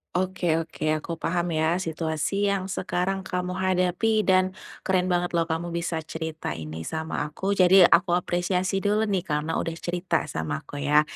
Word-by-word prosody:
Oke 180 -3 +1
oke. 155 -1 -2
Aku 165 -1 -5
paham 175 +1 -1
ya, 160 +2 +2
situasi 165 +4 -1
yang 190 0 -3
sekarang 190 +1 -2
kamu 180 0 -3
hadapi 185 +4 +2
dan 185 -1 +3 0.3
keren 185 -1 +2
banget 175 0 0
loh, 165 -1 +1
kamu 170 +1 -2
bisa 165 -2 -2
cerita 160 -1 -4
ini 80 0 -7
sama 160 -2 -3
aku. 190 +6 -2
Jadi 185 +1 +7
aku 175 +1 +5
apresiasi 180 +2 0
dulu 210 +2 +1
nih, 190 -2 0
karena 150 +2 -1
udah 165 - -2
cerita 175 +2 -1
sama 75 -2 -3
aku, 145 - -10
ya. 145 +1 +4
175 Hz, 165 wpm, -26 LUFS, 160-185 Hz, 0.3 s, Jadi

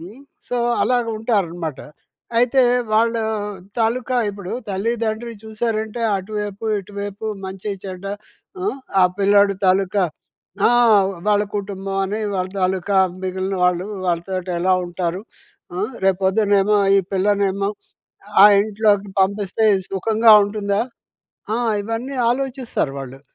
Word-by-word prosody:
హ్మ్. 200 +11 -11 0.3
సో, 245 - -2 0.3
అలాగుంటారనమాట. 215 - -1 0.6
అయితే, 255 +2 +4 0.3
వాళ్ళూ 230 +1 +2 0.6
తాలూకా 245 +3 0
ఇప్పుడు 200 -2 -7 0.2
తల్లి-దండ్రి 230 +3 -2
చూశారంటే, 220 0 -3 0.2
అటువైపు-ఇటువైపు, 205 0 -4 0.2
మంచి-చెడ్డ, 190 0 -6 0.6
ఆ! - - -2 0.4
ఆ - - +6 0.2
పిల్లాడు 200 0 +4
తాలూకా, 190 +1 +2 0.6
ఆ! - - +3 0.6
వాళ్ళ 205 0 +3
కుటుంబవని, 195 +1 -3
వాళ్ళ 185 0 -1
తాలూకా 190 +1 0 0.3
మిగిలిన 190 +1 -2
వాళ్ళు, 180 +1 +1 0.2
వాళ్ళతోటి 180 +1 -2
ఎలా 185 +1 +3
ఉంటారు? 175 +1 -3 0.5
ఆ! - - -4 0.3
రేపు 195 0 +2
పొద్దునేమో 205 +1 +3 0.2
ఈ - - +4
పిల్లనేమో, 200 0 +1 0.7
ఆ - - +12 0.2
ఇంట్లోకి 205 -1 +1
పంపిస్తే 200 +2 0 0.2
సుఖంగా 220 +3 +4
ఉంటుందా? 205 0 -1 0.7
ఆ! - - 0 0.3
ఇవన్నీ 230 +5 -4
ఆలోచిస్తారు 255 - -2
వాళ్ళు. 135 0 -8
200 Hz, 100 wpm, -20 LUFS, 190-220 Hz, 0.7 s, ఆ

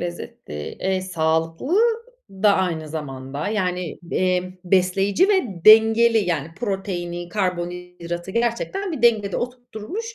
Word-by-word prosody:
lezzetli. 175 - -7 0.3
Eee, 190 0 0
sağlıklı 165 - 0 0.5
da 200 +1 +3
aynı 165 -4 -1
zamanda. 140 0 -5
Yani, 180 -5 -2
eee, 185 0 0
besleyici 195 - +2
ve 385 -6 +3 0.2
dengeli 225 +1 +7
yani 165 -7 -1
proteini, 180 -4 -4
karbonhidratı 180 -2 -4
gerçekten 240 - -1
bir 270 - -5
dengede 215 -5 +3
oturtturmuş, 250 - -6
185 Hz, 105 wpm, -22 LUFS, 175-220 Hz, 0.5 s, dengeli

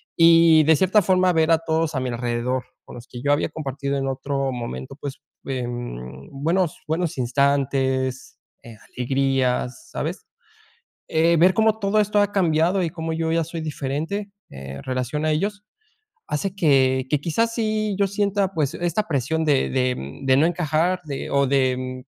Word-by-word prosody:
Y 165 -1 +6
de 160 +1 +5
cierta 190 +4 +4
forma, 185 0 +3
ver 160 0 +2
a 165 - +5
todos 160 -1 -1
a - - +1
mi 130 - -2
alrededor, 120 +1 -2 0.2
con - - -11
los 120 0 -11
que 120 -1 -9
yo 140 +2 +1
había 145 - 0
compartido 140 -2 -3
en 135 0 -2
otro 135 0 -2
momento, 120 - -6
pues, 140 -1 -7 0.2
em, 120 - -5
buenos 165 +5 -1
buenos 160 0 -1
instantes, 130 0 0 0.3
eh, 115 -2 -12 0.2
alegrías, 130 -1 0
¿sabes?, - - -4 0.8
eh, 165 +1 +3
ver 180 +4 +5
cómo 220 +1 +2
todo 200 +1 +1
esto 210 0 +2
ha 205 0 +2
cambiado 175 0 +2
y 170 - -1
cómo 160 -1 -4
yo 160 0 -1
ya 165 0 +2
soy 165 +1 -6
diferente, 155 +7 -3 0.2
en 70 0 -8
relación 130 +4 -2
a 155 - +2
ellos, 200 +6 -2 0.6
hace 185 +6 -2
que 130 -6 +3
que 150 - +1
quizás 230 +9 0
sí, 215 -3 -1
yo 200 - +3
sienta, 200 -1 0
pues, 150 -5 0
esta 175 +5 -1
presión 160 +2 0
de 145 -3 +2
de 125 - -2
de 130 -1 +3
no 145 - +4
encajar 175 +1 0
de 140 -3 -5
o 140 0 +2
de, 130 -1 +2
mm, 130 0 -6
150 Hz, 170 wpm, -23 LUFS, 130-175 Hz, 0.8 s, Y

